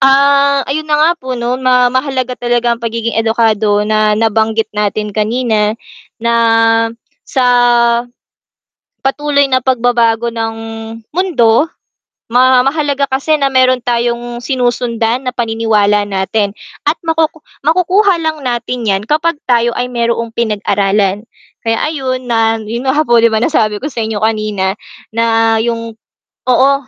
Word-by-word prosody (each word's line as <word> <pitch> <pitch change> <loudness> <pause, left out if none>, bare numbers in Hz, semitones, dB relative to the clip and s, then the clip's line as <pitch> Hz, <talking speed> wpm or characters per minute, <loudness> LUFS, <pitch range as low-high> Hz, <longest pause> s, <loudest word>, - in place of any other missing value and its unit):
Ah, 280 0 +4
ayun 305 +3 -3
na 300 - +2
nga 310 +2 +4
po 260 -3 -5
'no, 240 +2 -2
na 250 -1 +3
mahalaga 260 -1 -1
talaga 240 0 +1
ang 235 - -5
pagiging 230 0 -3
edukado 220 -2 +1
na 215 0 +2
nabanggit 220 0 0
natin 210 0 -2
kanina, 215 0 0 0.5
na, 235 0 +1 0.9
sa, 260 - 0 1.6
patuloy 285 +1 +1
na 255 -1 +2
pagbabago 235 -2 +1
ng 225 -1 -3 0.6
mundo, 300 -8 +2 0.6
ma 255 +1 +4
mahalaga 285 0 0
kasi 275 +4 +1
na 275 -2 0
meron 255 -1 +3
tayong 240 0 -2
sinusundan 245 -1 -1
na 250 - -2
paniniwala 220 -3 +1
natin 200 +1 -1 0.3
at - - +3
makuku 325 -1 -1 0.2
makukuha 365 +2 +2
lang 315 -1 -2
natin 240 -1 -3
'yan 195 -1 +1
kapag 315 +6 0 0.2
tayo 235 -1 +2
ay 250 0 -3
mayroong 235 -1 -1
pinag-aralan. 205 -2 0 0.3
Kaya 225 -1 0 0.2
ayun, 260 -3 -3
na 225 -1 +2
yun 235 +4 -5
nga 295 +4 +2
po, 240 -4 +4
di 230 - +5
ba 220 - -1
nasabi 215 -7 +1
ko 295 - -3
sa 240 - -5
inyo 220 -1 -3
kanina, 215 -3 0 0.4
na 225 0 +2
'yung 230 0 -3 0.6
oo. 260 +2 +4
235 Hz, 135 wpm, -14 LUFS, 225-265 Hz, 1.6 s, di